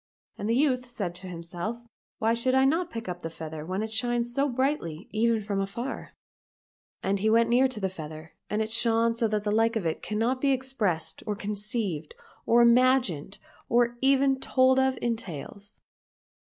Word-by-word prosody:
And 205 - -4
the 230 - +3
youth 255 -2 +1
said 200 -8 -4
to 185 +2 -10
himself, 175 +5 -4 0.2
" - - -82
Why 225 +1 +2
should 255 +3 +1
I 265 0 +5
not 330 +5 +1
pick 230 - -6
up 180 -1 -4
the 165 - -5
feather 160 -1 -7
when 185 +5 -3
it 220 0 -4
shines 240 +1 +1
so 280 +3 +2
brightly 250 - -2
even 225 0 +2
from 200 -1 -1
afar? 235 +7 -5 0.4
" - - -51
And 195 +1 0
he 215 +3 +2
went 230 +1 +4
near 255 +2 +5
to 255 -4 -6
the 195 - 0
feather, 155 -3 -9 0.2
and 215 +1 0
it 220 - -6
shone 230 0 +3
so 230 0 0
that 210 -1 -1
the 210 - -1
like 225 +1 +2
of 215 -6 -1
it 160 - -1
cannot 230 +5 -1
be 275 -1 +3
expressed 245 -11 -1
or 210 - -1
conceived 205 -5 -3 0.3
or 235 +1 +6
imagined 235 - +3 0.3
or 240 0 +2
even 270 0 +3
told 260 0 +3
of 265 -1 +2
in 235 -1 +1
tales. 200 - -9
225 Hz, 195 wpm, -27 LUFS, 195-250 Hz, 0.4 s, or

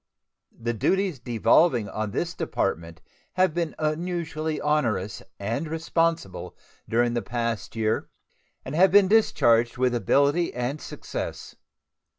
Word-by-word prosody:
The 120 +1 -2
duties 185 - 0
devolving 120 +1 +3
on 110 0 -3
this - - -2
Department 85 0 -3 0.3
have 185 -3 +2
been 170 -2 -2
unusually 160 0 -2
onerous 115 -10 0 0.2
and 115 +10 -2
responsible 165 - -1 0.3
during 120 +1 +2
the 120 - 0
past 115 -3 -3
year, 110 -1 -1 0.6
and 130 - -6
have 185 +5 +5
been 200 -1 +6
discharged 120 - +3
with 125 0 +2
ability 140 +7 +2
and 125 +5 -3
success. - - -6
135 Hz, 120 wpm, -25 LUFS, 115-165 Hz, 0.6 s, been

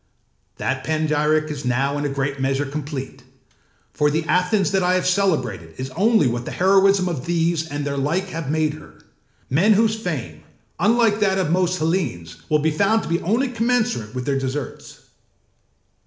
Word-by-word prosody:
That - - -2
panegyric 155 0 +1
is 145 -1 -6
now 135 +3 0
in 145 0 -2
a - - 0
great 140 0 -2
measure 135 +2 0
complete; 135 -2 -6 0.7
for 150 0 +2
the 155 +2 0
Athens 180 +4 +1
that 195 -1 +2
I 180 0 +2
have 185 - 0
celebrated 130 - 0
is 130 +1 -5
only 205 - +3
what 120 0 -1
the - - -5
heroism 195 0 +3
of 160 -6 -4
these 165 -1 0
and 145 -1 -4
their 140 -1 -2
like 165 +8 -1
have 165 -5 -5
made 155 0 +1
her, 155 0 -13 0.5
men 185 +11 +4
whose 220 +1 +3
fame, 130 - -5 0.4
unlike 220 +2 +3
that 195 -2 +2
of 180 -5 0
most 180 0 +1
Hellenes, 140 - -2
will 155 - +4
be 155 +1 +1
found 200 +8 +2
to - - -6
be 170 +1 0
only 235 +9 +1
commensurate 230 - -1
with 125 -1 -3
their 140 -1 0
deserts. 135 +1 -5
155 Hz, 175 wpm, -21 LUFS, 140-190 Hz, 0.7 s, men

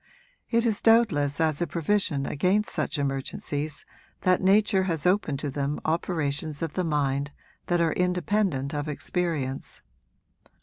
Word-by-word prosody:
It 230 0 +2
is 220 -3 +1
doubtless 170 -12 +3
as 160 -1 +2
a 175 - +1
provision 170 -4 0
against 190 +10 +1
such - - -2
emergencies 145 +2 -3 0.4
that 185 -1 +3
nature 195 0 +3
has 165 -5 -1
opened 180 -6 +2
to 145 - -3
them 140 +1 -2
operations 155 -2 -1
of 160 -2 -3
the 185 - -1
mind 140 -3 0 0.4
that 175 -1 +2
are 165 -2 +2
independent 180 -5 0
of 145 0 -3
experience. 150 -3 -3
160 Hz, 135 wpm, -26 LUFS, 145-185 Hz, 0.4 s, doubtless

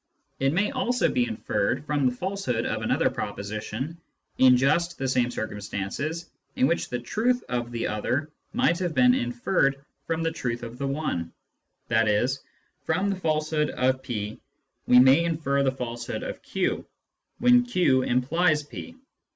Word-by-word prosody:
It 135 0 +2
may 195 - +1
also 250 -2 +1
be 250 -1 +1
inferred 130 - -1
from 145 -3 +1
the 125 - -1
falsehood 185 - -2
of - - -2
another - - +2
proposition, 110 +10 -5 0.4
in 130 -1 +7
just 165 +6 +1
the 135 - -2
same 125 -1 +2
circumstances 110 - -4 0.3
in 260 -1 +3
which 170 - 0
the 125 - -2
truth 230 - 0
of 120 -1 -2
the 115 -1 -2
other 130 +8 -1 0.2
might 170 +2 +2
have 175 -4 -2
been 125 -1 +6
inferred 130 +3 0 0.2
from 165 0 -1
the 165 - +1
truth 120 -7 -3
of 115 +2 -8
the 140 - -1
one; 135 - -2 0.6
i.e. 110 0 +3 0.6
from 190 +5 0
the - - -1
falsehood 155 -3 0
of 130 +1 +1
p 110 -5 -4 0.5
we 125 - +6
may 130 +6 +7
infer 155 -4 0
the 135 -1 +2
falsehood 120 -2 -5
of - - -6
q, - - -1 0.5
when 245 0 +5
q 180 - +2
implies 150 +6 +2
p. 245 - -9
140 Hz, 155 wpm, -26 LUFS, 120-170 Hz, 0.6 s, in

